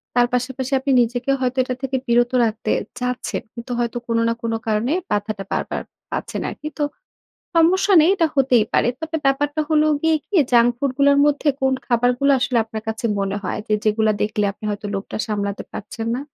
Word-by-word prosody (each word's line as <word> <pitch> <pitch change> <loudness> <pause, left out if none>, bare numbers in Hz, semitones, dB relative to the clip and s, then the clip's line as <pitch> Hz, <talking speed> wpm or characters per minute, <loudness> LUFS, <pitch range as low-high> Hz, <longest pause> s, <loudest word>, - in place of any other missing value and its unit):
তার 245 0 +4
পাশাপাশি 255 +1 -2
আপনি 275 +1 -1
নিজেকে 245 +3 -1
হয়তো 255 0 -1
এটা 255 0 -3
থেকে 265 0 -1
বিরত 240 +1 +3
রাখতে 220 0 -2 0.3
চাচ্ছেন। 250 0 -2
কিন্তু 235 +1 -8
হয়তো 240 0 -1
কোন 230 0 0
না 230 - +2
কোন 230 -1 -2
কারণে 220 +4 +1 0.2
বাধাটা 205 -1 -1
বারবার - - -2 0.3
পাচ্ছেন - - -3
আরকি। 300 - -7
তো, - - +2 0.7
সমস্যা 360 +5 +4
নেই 315 +4 +5
এটা 335 -5 +2
হতেই 255 -5 +4
পারে। - - +3
তবে 320 0 -3
ব্যাপারটা 290 +2 +1
হলো 305 0 +4 0.2
গিয়ে 320 0 +3
কি 410 - -2 0.2
junk 240 0 +6
food 275 -1 0
গুলার 280 0 +5
মধ্যে 290 +1 +1
কোন 265 0 +2
খাবারগুলা 245 +3 +2
আসলে 255 -3 +1
আপনার 220 -1 -7
কাছে 220 +2 -4
মনে 195 0 -1
হয় - - -2
যে, - - 0
যেগুলা 215 0 +2
দেখলে 210 0 0
আপনি 210 - -14
হয়তো 205 +1 -4
লোভটা 195 0 -4
সামলাতে 200 -2 -2
পারছেন 225 +2 -6
না? 260 - -4
245 Hz, 185 wpm, -21 LUFS, 220-280 Hz, 0.7 s, junk